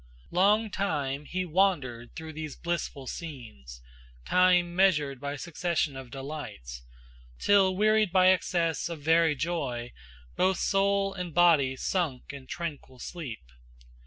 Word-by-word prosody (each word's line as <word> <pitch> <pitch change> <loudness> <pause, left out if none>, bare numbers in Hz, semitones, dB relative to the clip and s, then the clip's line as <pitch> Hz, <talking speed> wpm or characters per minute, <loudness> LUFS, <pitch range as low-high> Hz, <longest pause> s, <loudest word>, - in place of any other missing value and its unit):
Long 210 +4 +3
time 145 -8 -2
he 185 +4 -3
wandered 155 -10 0
through 160 0 -7
these 155 -2 -6
blissful 170 -5 -4
scenes, 115 - -8 0.4
Time 180 - +3
measured 155 -8 +2
by 140 +1 -4
succession 165 -1 -2
of 135 -2 -8
delights, 125 - -7 0.6
Till 195 -2 +4
wearied 215 0 +3
by 185 0 +5
excess 175 -3 +1
of 160 -4 -7
very 160 0 +4
joy 130 -7 -3 0.4
Both 190 0 +2
soul 195 0 +1
and 180 -4 -6
body 160 -7 +4
sunk 145 -3 -2
in 135 -2 -10
tranquil 155 -6 -6
sleep. 130 - -7
165 Hz, 125 wpm, -28 LUFS, 135-185 Hz, 0.6 s, by